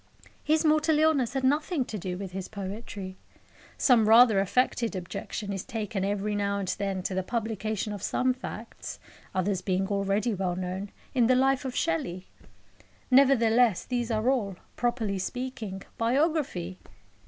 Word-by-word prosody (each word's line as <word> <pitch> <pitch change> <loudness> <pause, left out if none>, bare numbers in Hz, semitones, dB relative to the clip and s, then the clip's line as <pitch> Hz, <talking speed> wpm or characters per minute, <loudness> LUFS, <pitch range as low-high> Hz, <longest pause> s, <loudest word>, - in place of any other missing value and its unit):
His 315 +1 +2
mortal 310 0 +3
illness 290 -6 +2
had 265 - 0
nothing 295 +1 +1
to 220 - -6
do 180 0 -4
with 190 -1 -6
his 190 0 -5
poetry. 200 -2 -6 0.6
Some 230 -5 +4
rather 225 -2 +7
affected 230 +2 +1
objection 195 +3 -5
is 195 - -4
taken 215 -5 -3
every 205 +1 -1
now 200 -1 0
and 195 -2 -3
then 195 -2 -2
to 190 - -2
the 190 - 0
publication 215 -1 -2
of 205 - -6
some 255 0 +1
facts 255 - -8 0.4
(others 190 0 0
being 190 0 0
already 200 +3 0
well 185 -2 -1
known) 185 +2 -4 0.2
in 245 -4 +4
the 255 - +5
life 270 +1 +2
of 255 -1 -4
Shelley. 175 +3 -1 0.9
Nevertheless, 240 -6 +5
these 240 -2 -2
are 220 +1 0
all, 225 -8 +1 0.2
properly 230 -5 -1
speaking, 225 -3 -5 0.2
biography. 245 - 0
215 Hz, 150 wpm, -28 LUFS, 195-255 Hz, 0.9 s, rather